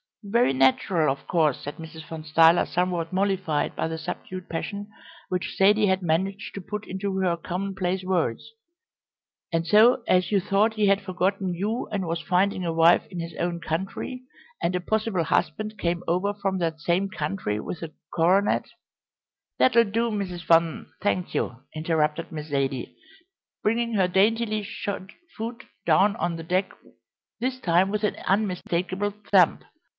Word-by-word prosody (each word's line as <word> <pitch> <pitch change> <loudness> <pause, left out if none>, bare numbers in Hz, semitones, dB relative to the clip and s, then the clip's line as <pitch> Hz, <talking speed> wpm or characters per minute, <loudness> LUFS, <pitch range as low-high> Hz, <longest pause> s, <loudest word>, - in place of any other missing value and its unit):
"Very 205 - +2
natural, 135 +4 +3
of 140 - -6
course," 155 -6 +2
said 145 - -7
Mrs. 160 -1 -10
Van 160 -1 -7
Stuyler, 165 +2 +5
somewhat 175 -1 -1
mollified 190 -5 0
by - - -1
the 160 0 -4
subdued 180 +2 -6
passion 200 +5 -4 0.4
which 180 0 -2
Zaidie 205 +2 +5
had 190 0 +1
managed 190 +4 -1
to 200 - -6
put 210 +3 -6
into 190 +1 -3
her 180 -3 +1
commonplace 185 +1 -3
words; 180 - -1 1.0
"and 165 0 0
so 225 +7 +5
as 180 +1 +3
you 200 - +4
thought 205 +4 +2
he 210 -2 +2
had 200 0 +3
forgotten 190 -1 -1
you 215 +7 -2
and 200 -3 -1
was 165 0 -2
finding 185 +1 +1
a 165 -2 -1
wife 165 +1 +5
in 180 - -6
his 165 -1 -6
own 175 0 -1
country, 190 +10 -4 0.4
and 180 +2 0
a - - +1
possible 215 -2 0
husband 215 +7 -1
came 175 +1 -1
over 190 +4 0
from 195 -2 -1
that 165 -2 -1
same 175 +5 0
country 185 - -3
with 165 - -6
a 160 -2 -7 0.2
coronet 185 +5 +3 0.5
" - - -67
"That'll 235 -2 +6
do, 230 +3 0
Mrs. 190 -5 -4
Van, 165 -1 +3
thank 185 -3 -1
you," 120 - -1 0.2
interrupted 155 0 0
Miss 155 -2 -6
Zaidie, 135 -2 -2 0.7
bringing 230 +2 +1
her 190 -3 +3
daintily 215 +3 +2
shod 200 -1 -5 0.2
foot 230 +2 -6 0.2
down 190 +6 +4
on 175 -6 -1
the 165 - -7
deck 185 +3 0 0.7
this 255 +2 -2
time 180 -2 +3
with 210 +1 -2
an 210 - +1
unmistakable 190 0 0
stamp. 185 -5 +4
185 Hz, 160 wpm, -25 LUFS, 165-200 Hz, 1.0 s, That'll